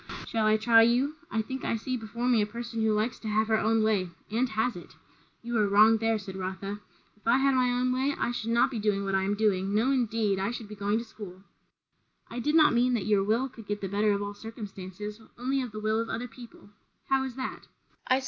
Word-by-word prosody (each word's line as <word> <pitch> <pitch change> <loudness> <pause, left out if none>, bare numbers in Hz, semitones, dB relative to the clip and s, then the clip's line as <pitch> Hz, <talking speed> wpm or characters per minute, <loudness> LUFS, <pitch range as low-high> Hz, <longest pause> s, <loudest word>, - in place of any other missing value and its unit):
"Shall 220 -1 0
I 215 0 +4
try 225 +1 +6
you? 250 +6 +3
I 220 0 -1
think 265 +3 -6
I - - 0
see 255 +3 -3
before 235 +1 -4
me 240 -3 +4
a 205 - 0
person 235 +1 -5
who 220 0 +2
likes 215 +3 0
to 220 - -7
have 215 +1 +1
her 220 -1 +3
own 220 0 +2
way 205 -5 +1 0.2
and 240 +3 +1
has 220 +2 0
it." 175 - -11 0.5
"You 240 0 -3
are 210 - +3
wrong 215 +3 +6
there," 225 0 +1
said 195 -2 -8
Rotha. 190 +2 -4 0.4
"If 210 +1 -16
I 235 +2 +5
had 275 0 +3
my 255 -1 +3
own 250 +1 +1
way, 270 +3 0
I - - 0
should 230 -2 -4
not 235 +3 +3
be 235 - -3
doing 205 -1 0
what 195 - -2
I 190 - +2
am 200 +2 0
doing; 200 -2 +1
no 235 +5 +3
indeed! 225 -6 +1
I 195 +2 0
should 235 -2 -6
be 210 - -9
going 205 +1 0
to 230 - -3
school." 195 -4 -11 0.9
"I 240 - -4
did 295 +5 0
not 310 -5 +6
mean 245 +1 +3
that 210 - -2
your 205 -2 +3
will 225 +6 +1
could 225 -5 -13
get 205 0 -2
the 195 - -4
better 205 +2 +2
of 200 0 -1
all 205 0 -4
circumstances; 210 -1 -8 0.2
only 265 +3 0
of 250 -3 -5
the 215 - -6
will 215 +1 0
of 230 - -2
other 245 +2 -3
people. 235 -3 -14
220 Hz, 235 wpm, -28 LUFS, 205-240 Hz, 0.9 s, try